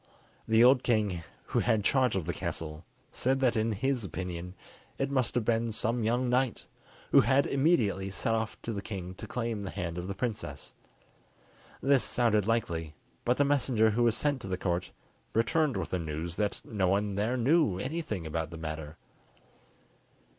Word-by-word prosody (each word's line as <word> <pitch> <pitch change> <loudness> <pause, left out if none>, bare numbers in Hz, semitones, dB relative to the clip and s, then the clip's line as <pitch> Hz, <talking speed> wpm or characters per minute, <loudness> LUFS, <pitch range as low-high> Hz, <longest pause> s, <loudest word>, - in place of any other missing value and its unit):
The 110 +1 +5
old 125 +1 +5
knight 105 -7 +1 0.2
who - - -1
had 110 -3 +2
charge 130 -1 +3
of 95 -5 -1
the 85 - -2
castle 80 0 -4 0.3
said 130 +2 0
that 125 -3 +3
in 110 +1 +1
his 125 +4 0
opinion 90 -1 -5 0.4
it 135 +1 -1
must 130 -4 0
have 120 -3 +1
been 115 0 +1
some 115 +2 0
young 120 +3 +1
knight, 125 0 +1 0.5
who - - +8
had 140 +1 +3
immediately 130 - +2
set 105 +3 -1
off 110 0 -2
to 115 - -3
the 100 - -3
king 95 -4 -6
to - - -9
claim 115 -3 -2
the 100 - -4
hand 85 -1 -4
of 90 - -5
the 100 - -4
princess. 115 +1 -4 1.1
This 135 -1 +4
sounded 110 -4 +2
likely, 85 -9 -1 0.3
but 125 +1 +2
the 145 - +4
messenger 125 -6 +3
who 115 +3 0
was 115 -2 +3
sent 145 -3 0
to - - -7
the 95 -1 -2
Court 90 0 -1 0.5
returned 135 +5 +2
with - - -3
the 90 - 0
news 80 +1 -4
that 105 0 -1
no 100 -4 0
one 100 +2 +1
there 110 +6 0
knew 135 - +3
anything 125 - -3
about 80 0 -2
the 85 - -8
matter. 80 0 -6
110 Hz, 180 wpm, -30 LUFS, 90-125 Hz, 1.1 s, who